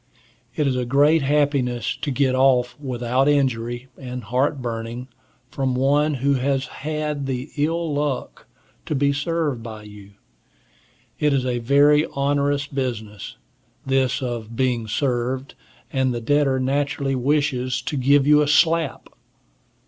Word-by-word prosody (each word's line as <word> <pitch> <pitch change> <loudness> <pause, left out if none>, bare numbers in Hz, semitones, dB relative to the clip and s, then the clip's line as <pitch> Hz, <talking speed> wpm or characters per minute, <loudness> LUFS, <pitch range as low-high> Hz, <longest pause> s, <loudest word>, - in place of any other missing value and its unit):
It 150 - 0
is 135 -2 +1
a 125 - 0
great 145 +6 +3
happiness 140 -4 0
to - - -4
get 135 -1 +1
off 130 -2 +3
without 130 0 0
injury 125 -3 0
and 125 -2 -6
heart 130 +6 0
burning, 120 +1 -5 0.4
from 130 0 -1
one 145 +3 +2
who 140 +2 +1
has 135 +1 0 0.2
had 150 -1 -3
the 130 +2 -4
ill 160 +1 -1
luck 145 -2 -3 0.4
to 155 - -1
be 140 +1 +2
served 150 -3 -1
by 110 -2 -8
you. 105 -1 -13 1.1
It 150 -1 +2
is 130 -2 +1
a 125 -1 -1
very 145 +5 +4
onerous 140 0 +1
business, 115 -6 -5 0.5
this 135 0 +1
of 115 -2 -5
being 120 -3 0
served, 130 +2 -1 0.4
and 130 -1 +1
the - - -2
debtor 135 +2 +2
naturally 140 +1 -1
wishes 130 -1 0
to - - -3
give 140 +1 +3
you 150 +1 +5
a 150 - +1
slap. 160 +1 +2
135 Hz, 140 wpm, -22 LUFS, 125-145 Hz, 1.1 s, you